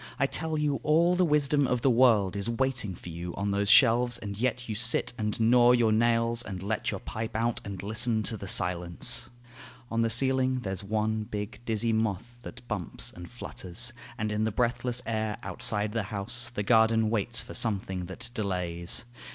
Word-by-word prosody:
I 135 - +2
tell 160 +3 -1
you 150 -2 0
all 170 +4 +3
the 180 - +2
wisdom 150 -3 +2
of 125 -1 -1
the 135 - +4
world 115 -6 +3
Is 100 +3 -2
waiting 120 -5 -1
for 90 - -10
you 85 +1 -7
on 100 +1 -2
those 100 0 0
shelves; 120 +1 +5
and 100 -1 -7
yet 125 +2 -2
You 110 - -3
sit 120 +3 0
and 105 -2 -3
gnaw 120 +2 +5
your 120 -3 +3
nails, 115 +1 +2
and 95 -5 -6
let 105 +2 -2
your - - -3
pipe 110 0 -6
out, 115 +1 0
And 100 -2 -7
listen 110 +1 +2
to 110 - 0
the 100 -2 -8
silence: 90 -2 +2 0.6
on 115 0 0
the 115 - +1
ceiling 130 +1 +2
There's 95 -3 -3
one 110 +1 -1
big, 105 +1 -6
dizzy 115 0 0
moth 110 +2 -2
that 120 - -11
bumps 100 -7 -1
and 85 0 -10
flutters; 120 -1 -3 0.2
And 110 -2 -2
in 105 +1 -1
the 110 - 0
breathless 120 +2 -1
air 110 -2 -2
outside 105 0 0
the 115 +1 -1
house 110 +4 -1
The 105 -4 -4
garden 110 0 +3
waits 115 +1 +1
for - - -9
something 95 -5 -2
that 95 +5 -7
delays. 90 -3 0
110 Hz, 190 wpm, -28 LUFS, 100-120 Hz, 0.6 s, shelves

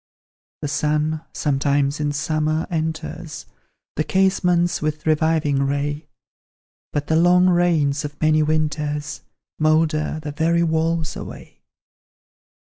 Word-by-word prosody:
The - - 0
sun, 150 +2 0
sometimes 140 0 0
in 150 -1 0
summer, 155 +1 -1
enters 160 -1 -4 0.5
The 155 - 0
casements, 180 -1 +1
with 155 0 -3
reviving 155 -2 +2
ray; 145 +2 -2 0.8
But 145 0 -2
the 160 - +1
long 180 +2 +5
rains 160 -5 +2
of 145 0 -7
many 155 0 +3
winters 150 -1 -1 0.4
Moulder 155 0 +1
the 150 - -4
very 165 +3 +1
walls 160 0 0
away. - - -10
155 Hz, 110 wpm, -21 LUFS, 150-160 Hz, 0.8 s, long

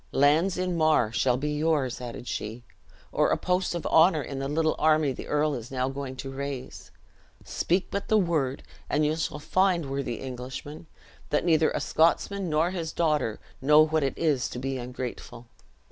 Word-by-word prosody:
"Lands 155 +7 +3
in 180 -1 -1
Mar 155 -9 +3
shall 125 +1 +2
be 150 +3 -2
yours," 150 -5 0
added 120 0 -7
she, 110 +3 -5 0.5
"or - - +2
a - - +2
post 180 0 0
of 170 - -4
honor 160 -2 +4
in 135 +1 -6
the 135 - -2
little 155 +2 +1
army 155 -2 +3
the - - -8
earl 150 0 +1
is 120 -2 -6
now 130 0 -1
going 135 -1 -5
to 135 +1 -6
raise. 135 -1 -6 0.6
Speak 180 +2 -1
but 200 - -3
the 215 - +4
word, 155 -9 0 0.3
and 150 +1 +2
you 155 +1 +1
shall 160 -2 -3
find, 175 -2 +1
worthy 135 -3 -2
Englishman, 130 +5 -7 0.4
that 150 - +1
neither 160 -2 +4
a - - -2
Scotsman, 180 +3 +1
nor 160 +3 +2
his 165 -4 -4
daughter, 150 -9 0 0.2
know 150 +3 +6
what 155 0 0
it 135 -1 -1
is 145 -7 +1
to - - -7
be 135 +1 -3
ungrateful." 125 -1 -7
150 Hz, 180 wpm, -27 LUFS, 130-165 Hz, 0.6 s, know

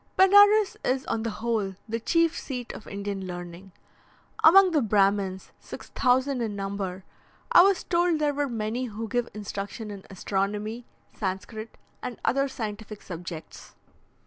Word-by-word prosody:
Benares 410 +2 +6
is 260 +1 0
on 225 - -1
the 230 - -2
whole 215 -3 -2
the 230 +1 -2
chief 335 +6 +2
seat 250 -4 -5
of - - -10
Indian 200 -1 -4
learning. 175 +1 -8 0.7
Among 375 +3 +8
the 305 -3 +3
Brahmins, 195 -3 +1
6,000 260 0 0
in 215 -3 -2
number, 195 -2 -4 0.5
I - - +9
was 390 +1 +3
told 345 -1 +2
there 300 -1 +1
were 285 0 -1
many 230 +2 -2
who 225 -1 -5
give 240 +2 -1
instruction 205 +1 -5
in 200 -1 -9
astronomy, 205 +4 -2 0.3
Sanscrit, 215 +3 -5 0.2
and 250 -2 -6
other 275 +2 +2
scientific 215 -4 -6
subjects. 170 -2 -9
220 Hz, 140 wpm, -26 LUFS, 200-270 Hz, 0.7 s, I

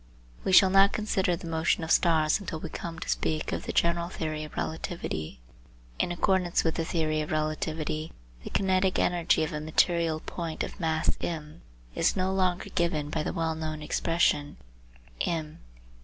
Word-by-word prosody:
We - - 0
shall 190 0 +7
not 195 +1 +6
consider 190 -4 +1
the 170 - -9
motion 165 0 +1
of 160 - -3
stars 160 -1 +4
until 180 -5 -5
we - - -6
come 165 -1 -6
to - - -6
speak 155 -1 -1
of - - -4
the - - -1
general 170 0 +1
theory 155 -3 -3
of 155 - -10
relativity. 160 - -4 0.6
In - - +1
accordance 180 0 +2
with 160 - +1
the 165 - -1
theory 155 -2 0
of 150 - -5
relativity 155 0 -2 0.3
the - - -6
kinetic 190 -1 +2
energy 175 -2 +2
of 155 +1 -3
a 150 - -3
material 160 +1 +2
point 165 -1 -4
of - - -7
mass 160 -2 +1
m 155 -1 -5 0.3
is - - +2
no 190 0 0
longer 185 -2 0
given 155 -4 0
by 155 - -1
the - - -2
well 165 -2 -1
known 155 -1 -4
expression 150 -2 +1 0.7
eq. 160 -2 -2
165 Hz, 170 wpm, -28 LUFS, 155-175 Hz, 0.7 s, shall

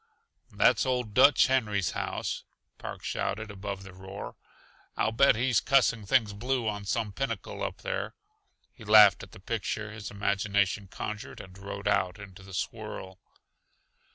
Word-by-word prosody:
"That's - - +4
old 125 -5 -1
Dutch 135 +5 +6
Henry's 105 -8 +1
house," - - -3 0.4
Park - - -7
shouted 110 +2 -3
above 100 -1 -6
the 95 -1 -11
roar. 95 +2 -8 0.6
"I'll 110 - +1
bet 135 +3 +5
he's 120 -1 +2
cussing 115 -6 +2
things 110 -3 +3
blue 120 +3 -1
on 105 -1 -3
some 110 +1 -1
pinnacle 135 +4 -4
up - - -4
there." - - -3 0.6
He 115 - -14
laughed 105 -3 +7
at 95 - -11
the - - -13
picture 110 +1 -3
his 105 -1 -7
imagination 100 0 0
conjured, 105 +3 -6
and 95 -1 -11
rode 100 +1 -6
out 90 +1 +1
into 100 -2 -11
the 95 -1 -10
swirl. 95 -2 -5
105 Hz, 150 wpm, -29 LUFS, 100-115 Hz, 0.6 s, laughed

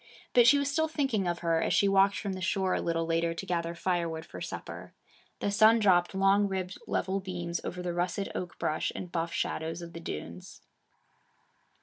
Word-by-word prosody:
But 240 -1 +6
she 285 - +7
was 280 0 0
still 315 +2 +1
thinking 270 - 0
of 175 0 -1
her, 165 -1 +2
as - - +1
she 200 - +4
walked 195 0 +4
from 200 0 -3
the 185 - -6
shore 185 0 0
a - - 0
little 165 -1 -1
later 165 0 0
to 195 - -5
gather 170 -2 -2
firewood 170 -2 -1
for - - -10
supper. - - -7 0.5
The 205 - 0
sun 220 +2 +6
dropped 185 -4 +3
long 195 +1 +4
ribbed 190 -1 -4
level 195 +1 -1
beams 175 -3 -4
over 180 0 -5
the 175 -1 -2
russet 175 +3 -1
oak 180 -2 -5
brush 155 - -1
and 180 - -6
buff 165 -1 -2
shadows 165 +2 -3
of 170 0 -9
the 165 - -7
dunes. 85 - -8
180 Hz, 200 wpm, -29 LUFS, 170-195 Hz, 0.5 s, she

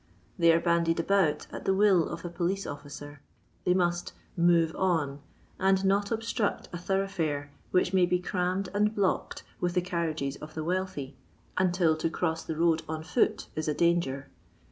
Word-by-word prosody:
They 170 -1 +6
are 165 - +4
bandied 170 -1 +2
about 165 -4 +2
at - - -7
the 190 - +3
will 195 -4 +4
of 170 - -6
a - - -3
police 180 +3 -1
officer. 145 0 -8 0.4
They 180 - +3
must 175 -1 0 0.2
" - - -33
move 170 -2 +3
on 160 -7 0 0.2
" - - -32
and 190 0 +3
not 200 +1 +2
obstruct 225 -1 -1
a 175 - -4
thoroughfare 175 -6 -1 0.2
which 180 0 +2
may 185 -2 +4
be 180 - +2
crammed 180 +1 -1
and 210 +1 +2
blocked 195 -2 0 0.2
with 175 0 -1
the 180 - +3
carriages 160 -6 -2
of 155 0 -10
the 160 - -3
wealthy 175 -6 -3 0.4
until 180 -3 +3
to 165 - 0
cross 165 -1 -1
the 160 - -4
road 165 -1 +3
on 160 0 -3
foot 180 +2 +1
is 155 0 -2
a 150 - 0
danger. 170 -6 +1
175 Hz, 180 wpm, -29 LUFS, 160-190 Hz, 0.4 s, They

